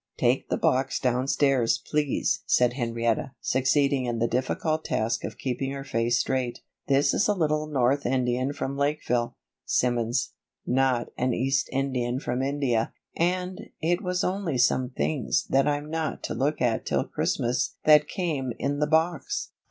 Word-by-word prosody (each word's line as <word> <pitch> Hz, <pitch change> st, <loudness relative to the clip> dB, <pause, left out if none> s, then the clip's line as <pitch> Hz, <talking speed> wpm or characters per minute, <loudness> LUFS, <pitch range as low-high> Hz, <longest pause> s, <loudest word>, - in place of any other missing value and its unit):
"Take -, -, +1 dB
the -, -, 0 dB
box 130 Hz, +1 st, +1 dB
downstairs, 130 Hz, 0 st, +2 dB
please," 150 Hz, -3 st, 0 dB
said 125 Hz, -1 st, +3 dB
Henrietta, 115 Hz, 0 st, -1 dB
succeeding 135 Hz, +1 st, +2 dB
in 120 Hz, -1 st, -2 dB
the 115 Hz, +1 st, +1 dB
difficult 155 Hz, +6 st, -1 dB
task 115 Hz, +2 st, -1 dB
of -, -, -5 dB
keeping 135 Hz, +1 st, -2 dB
her 135 Hz, 0 st, -5 dB
face 120 Hz, -2 st, +1 dB
straight. 130 Hz, -2 st, -1 dB, 0.3 s
"This 140 Hz, 0 st, +3 dB
is -, -, +2 dB
a 210 Hz, -, +2 dB
little 155 Hz, -3 st, 0 dB
North 140 Hz, -1 st, +1 dB
Indian 130 Hz, +1 st, 0 dB
from 140 Hz, -1 st, -4 dB
Lakeville, 140 Hz, -4 st, -1 dB, 0.3 s
Simmons, 120 Hz, 0 st, 0 dB, 0.3 s
not 130 Hz, -2 st, +1 dB
an 125 Hz, -1 st, +1 dB
East 135 Hz, +2 st, 0 dB
Indian 130 Hz, -2 st, -1 dB
from 125 Hz, -2 st, -2 dB
India, 135 Hz, -5 st, 0 dB, 0.2 s
and 180 Hz, +2 st, -1 dB
it 175 Hz, +3 st, +1 dB
was 180 Hz, -2 st, -1 dB
only 180 Hz, -7 st, -1 dB
some 125 Hz, +1 st, +2 dB
things 135 Hz, -1 st, -1 dB
that 135 Hz, +1 st, +3 dB
I'm 145 Hz, +1 st, -1 dB
not 160 Hz, -1 st, -3 dB
to -, -, -3 dB
look 140 Hz, 0 st, 0 dB
at 115 Hz, -2 st, +1 dB
till -, -, 0 dB
Christmas 125 Hz, +2 st, -1 dB
that 150 Hz, -1 st, +6 dB
came 150 Hz, -, -2 dB
in 145 Hz, +2 st, -1 dB
the 150 Hz, -, +2 dB
box." 170 Hz, -, 0 dB
135 Hz, 155 wpm, -26 LUFS, 125-150 Hz, 0.3 s, that